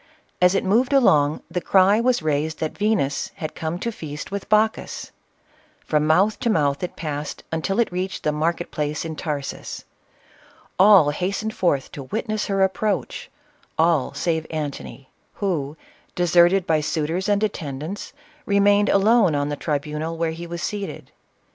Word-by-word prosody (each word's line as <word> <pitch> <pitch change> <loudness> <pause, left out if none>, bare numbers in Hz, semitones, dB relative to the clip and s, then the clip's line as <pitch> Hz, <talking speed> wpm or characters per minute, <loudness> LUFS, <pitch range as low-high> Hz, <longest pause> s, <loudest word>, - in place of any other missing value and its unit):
As 180 +1 +5
it - - +1
moved 235 +8 +2
along, 155 - +4
the 180 - -2
cry 195 +4 +4
was 245 -6 +1
raised, 155 +1 -1
that 155 - -3
Venus 205 -10 0
had 155 - -5
come 160 +1 -3
to 235 +5 -3
feast 155 -7 -7
with 200 0 -5
Bacchus. 215 +1 0 0.7
From 150 0 +1
mouth 190 +7 +3
to 235 - 0
mouth 145 -8 +1
it 180 - -4
passed, 150 -2 -5
until 165 +6 -1
it 235 - +2
reached 185 +1 -3
the 150 - +1
market 165 +3 -1
place 150 +1 -2
in 160 -1 -5
Tarsus. 145 -3 -5 0.9
All 190 -6 +7
hastened 200 +7 -2
forth 145 -7 0
to 145 - -7
witness 215 - -3
her 195 -1 +2
approach, 195 +1 -1 0.3
— - - -36
all 160 -4 +2
save 160 -2 -1
Antony, 145 -3 -6 0.2
who, 160 -7 -2 0.4
deserted 175 +1 +4
by 155 -1 +2
suitors 160 +6 -1
and 205 +1 +2
attendants, 160 -2 -4 0.4
re 200 - +2
mained 205 +1 +4
alone 200 -4 +4
on 145 0 0
the 145 - -2
tribunal 150 +2 -3
where 165 0 0
he 170 +1 -7
was 170 0 -5
seated. 205 -2 -5
170 Hz, 160 wpm, -23 LUFS, 150-200 Hz, 0.9 s, All